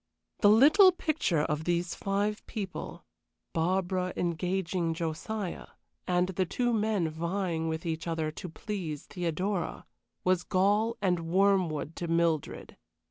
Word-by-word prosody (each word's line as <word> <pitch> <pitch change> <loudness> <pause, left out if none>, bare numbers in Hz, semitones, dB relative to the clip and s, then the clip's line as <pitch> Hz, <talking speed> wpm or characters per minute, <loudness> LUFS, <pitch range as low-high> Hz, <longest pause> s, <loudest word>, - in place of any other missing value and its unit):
The 205 - +6
little 300 - +7
picture 310 - 0
of 150 +1 -2
these 175 0 0
five 205 +2 -1
people 200 -5 -6 0.5
Barbara 185 +2 0
engaging 175 0 -1
Josiah, 170 +5 -4 0.4
and 180 0 +2
the 185 0 0
two 240 +6 0
men 210 -5 +1
vying 170 +1 -2
with 160 +1 -3
each 165 0 -3
other 160 -2 -1
to 180 - -7
please 165 -5 -5
Theodora 180 +2 -2 0.4
was 185 -1 +2
gall 205 +6 +2
and 175 -3 +1
wormwood 180 -5 +2
to 170 - -3
Mildred. 165 -2 0
180 Hz, 125 wpm, -29 LUFS, 165-200 Hz, 0.5 s, little